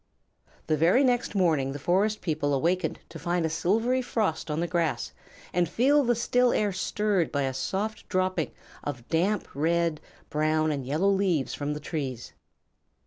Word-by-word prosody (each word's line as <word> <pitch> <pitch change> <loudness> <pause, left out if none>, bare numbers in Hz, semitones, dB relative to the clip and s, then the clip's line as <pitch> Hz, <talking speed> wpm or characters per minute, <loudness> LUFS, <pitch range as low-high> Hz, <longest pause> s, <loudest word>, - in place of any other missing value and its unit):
The 155 - +2
very 170 - +4
next 245 -4 +1
morning 155 -8 +2
the - - -4
Forest 195 +8 +1
People 150 -4 0
awakened 170 +4 0
to 165 - -9
find 175 +2 0
a 160 - -1
silvery 225 +10 +1
frost 210 -10 -1
on 150 +1 -1
the 170 - +1
grass 170 -3 -1 0.4
and 175 -1 +2
feel 280 - +3
the 240 -1 +2
still 245 +2 +2
air 205 -2 +1
stirred 195 -1 0
by 140 -1 0
the 135 -1 -1
soft 205 +10 -3
dropping 185 -3 0 0.3
of 130 -5 -5
damp 185 +5 +1
red, 165 +1 +1 0.3
brown, 155 +1 +1
and 140 -4 -3
yellow 165 +8 +2
leaves 185 -9 +1
from 145 +1 -3
the - - -5
trees. 140 -6 -5
170 Hz, 165 wpm, -27 LUFS, 150-200 Hz, 0.4 s, very